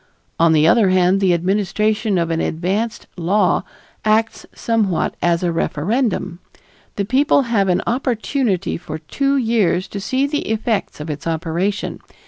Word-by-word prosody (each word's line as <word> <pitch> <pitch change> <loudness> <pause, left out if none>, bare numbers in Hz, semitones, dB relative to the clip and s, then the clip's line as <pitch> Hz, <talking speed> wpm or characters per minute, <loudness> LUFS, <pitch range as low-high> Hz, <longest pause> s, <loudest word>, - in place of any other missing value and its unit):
On 165 0 +5
the 155 0 +4
other 200 +2 +4
hand, 185 +1 +3
the 190 -2 +3
administration 205 +4 0
of 170 -1 0
an 165 - 0
advanced 195 +8 -2
law 180 +2 +2 0.4
acts 220 +1 +1
somewhat 215 -6 0
as 170 0 +1
a 175 - +1
referendum. 180 - -1 0.6
The 200 - -1
people 275 +5 +3
have 215 -6 +1
an 180 +1 +1
opportunity 235 -4 -1
for 155 -2 -7
two 275 - -1
years 220 -7 +1
to 200 - -5
see 260 +7 0
the 290 -3 -2
effects 220 -4 -1
of 150 +1 -4
its 150 +2 -6
operation. 165 +5 -2
195 Hz, 145 wpm, -19 LUFS, 170-225 Hz, 0.6 s, On